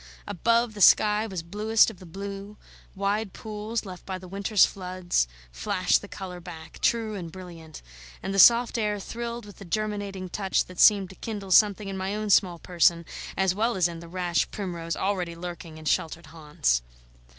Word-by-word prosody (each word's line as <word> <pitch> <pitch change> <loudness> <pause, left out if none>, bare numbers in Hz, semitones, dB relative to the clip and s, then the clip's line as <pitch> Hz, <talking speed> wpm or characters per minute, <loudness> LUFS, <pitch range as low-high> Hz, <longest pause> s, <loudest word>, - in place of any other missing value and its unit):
Above, 230 +4 +1
the 205 - -7
sky 210 +2 +5
was 185 -5 -5
bluest 215 +6 +2
of 195 - -16
the 185 - -12
blue; 200 +3 -7 0.4
wide 200 +1 -1
pools 215 +1 -5
left 185 -2 -9
by 190 -1 -5
the 185 0 -11
winter's 200 +2 +3
floods 180 - -1 0.2
flashed - - +1
the - - -10
colour 180 -2 -8
back, 170 -2 -11
true 225 -2 +1
and 175 -5 -6
brilliant; 170 - -11 0.4
and 195 - -3
the 195 - +1
soft 235 +4 +6
air 210 -1 -1
thrilled 235 +2 -6
with 205 - -13
the - - -10
germinating 200 0 -3
touch 190 +1 0
that 180 -1 -12
seemed 200 -3 +6
to - - -13
kindle 205 -3 -6
something 205 +1 +4
in 195 -1 -4
my 190 +2 -2
own 215 -1 -2
small 180 -3 +4
person 170 -1 +2 0.3
as 190 -1 +2
well 225 +4 0
as 180 -2 +3
in 170 -1 -7
the 170 - -11
rash 175 0 -1
primrose 170 -4 -4
already 185 -3 -2
lurking 170 -2 -8
in 155 - -11
sheltered 165 +2 -1
haunts. 150 - -1
190 Hz, 185 wpm, -26 LUFS, 175-210 Hz, 0.4 s, soft